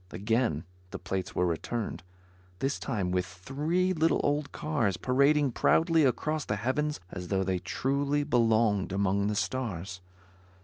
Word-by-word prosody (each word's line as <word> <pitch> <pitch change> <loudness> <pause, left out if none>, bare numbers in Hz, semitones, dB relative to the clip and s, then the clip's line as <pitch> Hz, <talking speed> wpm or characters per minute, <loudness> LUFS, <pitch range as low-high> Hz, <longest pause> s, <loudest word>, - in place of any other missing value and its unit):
Again 110 - 0 0.3
the - - -6
plates 95 -2 -4
were 90 - +2
returned; 85 0 -3 0.6
this 135 +6 -1
time 100 -8 -2
with 90 0 +1
three 150 - -1
little 165 -1 +2
old 145 0 0
cars 120 - -1
parading 140 +2 +3
proudly 165 +4 +3
across 155 +4 0
the 105 - -2
heavens 145 +8 -1
as 90 -2 -6
though 95 0 +1
they 95 -1 -1
truly 140 +7 0
belonged 115 -7 +2
among 100 +1 +1
the 105 - -1
stars. 95 -6 -3
115 Hz, 140 wpm, -29 LUFS, 95-145 Hz, 0.6 s, parading